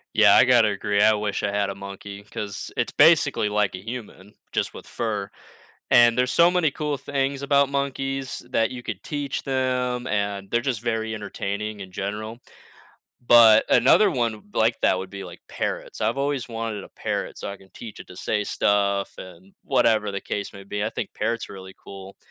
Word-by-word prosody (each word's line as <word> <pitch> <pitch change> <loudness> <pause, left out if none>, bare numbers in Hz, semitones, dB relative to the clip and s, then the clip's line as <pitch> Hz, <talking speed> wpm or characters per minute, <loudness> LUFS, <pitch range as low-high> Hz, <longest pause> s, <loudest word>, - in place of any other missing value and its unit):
Yeah, 110 -2 +7
I 125 - +7
gotta 120 -4 +5
agree, 100 0 0
I 110 +1 +6
wish 105 -1 -2
I 100 - -1
had 100 -1 0
a - - -8
monkey, 100 +1 -9
'cause 105 -1 -6
it's 120 - 0
basically 145 -8 +4
like 105 -2 +1
a 90 - -6
human, 110 -4 -8 0.2
just - - -1
with - - -10
fur, 105 -4 -3 0.6
and 120 -1 +6
there's 125 0 +1
so 170 +1 +5
many 170 -5 +2
cool 150 0 -3
things 140 0 -2
about 140 0 +3
monkeys 135 -1 -2
that 115 -3 +1
you 125 -1 -6
could - - -5
teach 145 -3 -3
them, 125 -2 -1
and 100 -1 -2
they're 120 - +2
just 120 -4 -2
very 110 -2 -2
entertaining 105 0 -4
in 95 -1 -8
general, 105 +4 -5 0.8
but 115 -3 +7
another 190 - +5
one 120 -3 +1
w 105 -1 -14
like 115 +1 +2
that, 95 - +4
would 95 0 -6
be, 100 0 -7
like, 85 - -11
parrots. - - -4
I've 115 - 0
always 140 -3 -1
wanted 115 -3 -4
a - - -13
parrot - - -4
so - - -5
I 100 - -7
can 95 -1 -20
teach 115 -3 -10
it - - -10
to 90 - -12
say 105 +2 -1
stuff, 100 -1 0
and 95 +1 -12
whatever 115 -6 +2
the 100 - -3
case 100 -1 -4
may 100 -1 -11
be, 105 +1 -3
I 110 - -1
think - - -5
parrots 115 +2 -2
are - - -10
really 95 0 -10
cool, 95 0 -11
110 Hz, 200 wpm, -24 LUFS, 100-125 Hz, 0.8 s, Yeah